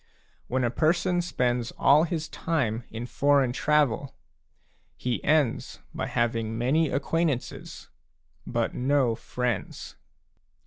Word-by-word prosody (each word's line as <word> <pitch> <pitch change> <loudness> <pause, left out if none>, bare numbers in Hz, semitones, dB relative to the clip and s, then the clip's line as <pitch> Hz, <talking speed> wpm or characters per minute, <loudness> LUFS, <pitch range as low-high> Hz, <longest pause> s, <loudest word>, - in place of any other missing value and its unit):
When 130 +1 0
a 120 - +1
person 175 +5 +1
spends 125 -8 -1
all 150 +4 +5
his 160 -2 -3
time 120 -9 -2
in 115 +2 -6
foreign 140 -1 +2
travel, 145 -3 +1 0.8
he 125 -1 -2
ends 150 -6 +1 0.2
by - - -3
having 115 -1 -1
many 140 +6 +2
acquaintances, 150 -2 -2 0.6
but - - -1
no 130 -2 +2
friends. 120 -1 -4
130 Hz, 105 wpm, -27 LUFS, 120-155 Hz, 0.8 s, all